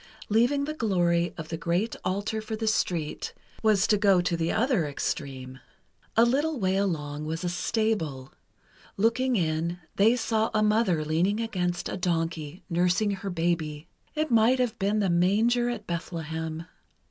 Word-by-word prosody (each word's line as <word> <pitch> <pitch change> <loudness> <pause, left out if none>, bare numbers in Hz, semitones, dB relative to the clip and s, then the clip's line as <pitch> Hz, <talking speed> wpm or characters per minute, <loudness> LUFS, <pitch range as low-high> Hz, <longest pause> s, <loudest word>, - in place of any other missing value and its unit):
Leaving 245 +7 +3
the 305 - -3
glory 175 - +1
of 160 -1 -7
the 165 - -3
great 175 +7 -1
altar 205 +4 -1
for 220 +1 -4
the 220 +1 -3
street, 175 -8 -1 0.3
was 215 -3 +3
to 210 - +3
go 200 -3 +5
to 175 -1 0
the 165 0 0
other 225 - +1
extreme. 135 -2 -4 0.6
A 230 - +7
little 285 +4 +1
way 190 -2 +1
along, 155 -6 -2
was 160 +3 -3
a 175 - 0
stable. 175 - -1 0.6
Looking 240 +5 +2
in, 165 -1 0 0.2
they 220 +4 +5
saw 225 -2 0
a 215 - +3
mother 210 -7 +2
leaning 175 +7 +1
against 180 -6 -2
a - - -4
donkey, 165 -2 -2
nursing 180 +4 +2
her 195 0 -4
baby. 165 -3 -2 0.3
It 310 -2 -1
might 230 +3 +5
have 245 -3 -1
been 205 +2 +1
the 195 - +1
Manger 220 +8 +3
at 225 -4 -4
Bethlehem. 160 -1 -4
190 Hz, 160 wpm, -27 LUFS, 165-220 Hz, 0.6 s, A